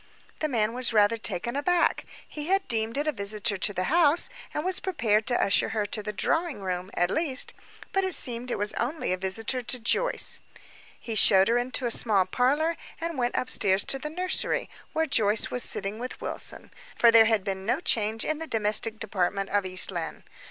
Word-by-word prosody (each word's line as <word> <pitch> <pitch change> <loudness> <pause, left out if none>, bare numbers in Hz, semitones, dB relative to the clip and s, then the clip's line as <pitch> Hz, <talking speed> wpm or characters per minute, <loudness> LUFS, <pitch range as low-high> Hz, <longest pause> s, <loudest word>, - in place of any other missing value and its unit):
The 310 - -1
man 225 -4 0
was 245 -1 +3
rather 210 +1 +3
taken 225 +3 -3
aback. 345 +5 +1 0.2
He 300 0 -7
had 385 +1 0
deemed 225 +1 -1
it 290 - -1
a 305 - +1
visitor 210 -2 -2
to 205 - +1
the 185 -2 -3
house, 330 - +4 0.2
and 300 - -4
was 370 0 +1
prepared 220 - 0
to 245 - +1
usher 200 - +2
her 210 - 0
to 210 +1 -2
the 210 0 -5
drawing 325 - -1
room, 185 -1 -4
at 175 +1 +1
least; 280 -3 0 0.4
but 390 -2 0
it 375 -2 +3
seemed 245 -1 0
it - - -2
was 205 +1 -1
only 250 - -2
a - - -2
visitor 215 +7 -3
to 250 +1 -3
Joyce. 480 - +2 0.6
He 230 - -6
showed 195 -2 +5
her 240 +1 +2
into 255 +1 -2
a 235 - -1
small 205 -5 +3
parlor, 285 - 0 0.2
and 335 0 -4
went 245 0 -1
upstairs 200 -6 +1
to 270 - +1
the 300 - -6
nursery, 365 +4 -1 0.2
where 320 0 0
Joyce 215 -6 +2
was 250 - +3
sitting 205 0 0
with 250 +1 -7
Wilson - - -3 0.2
for 235 - +5
there 225 -1 +7
had 220 -3 +1
been 190 -1 -4
no 210 - 0
change 220 0 -1
in 310 0 -2
the 325 - -6
domestic 220 -2 0
department 195 -2 -2
of 200 -1 0
East 185 +1 +2
Lynne. 170 -3 -6
230 Hz, 200 wpm, -26 LUFS, 205-290 Hz, 0.6 s, there